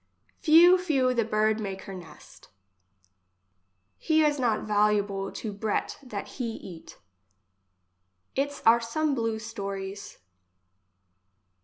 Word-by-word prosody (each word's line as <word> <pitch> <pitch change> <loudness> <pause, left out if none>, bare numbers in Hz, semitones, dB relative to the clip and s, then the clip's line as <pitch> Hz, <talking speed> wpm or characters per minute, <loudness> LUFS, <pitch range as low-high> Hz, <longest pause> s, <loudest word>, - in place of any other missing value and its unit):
Few, 345 +4 +7
few 270 -8 +1
the 235 -2 +1
bird 215 0 +1
make 195 -2 -5
her 195 - -8
nest 180 -3 -13 1.5
He 315 -1 +3
is 295 -1 +1
not 235 -4 +1
valuable 205 -2 +1
to 215 -3 -5
breat 205 +1 -2
that 220 -7 -6
he 235 -4 -5
eat 170 -6 -11 1.4
Its 285 +1 -2
are 230 +1 +6
some 290 +6 -1
blu 225 -3 -1
stories. 200 -3 -6
225 Hz, 110 wpm, -27 LUFS, 205-270 Hz, 1.5 s, Few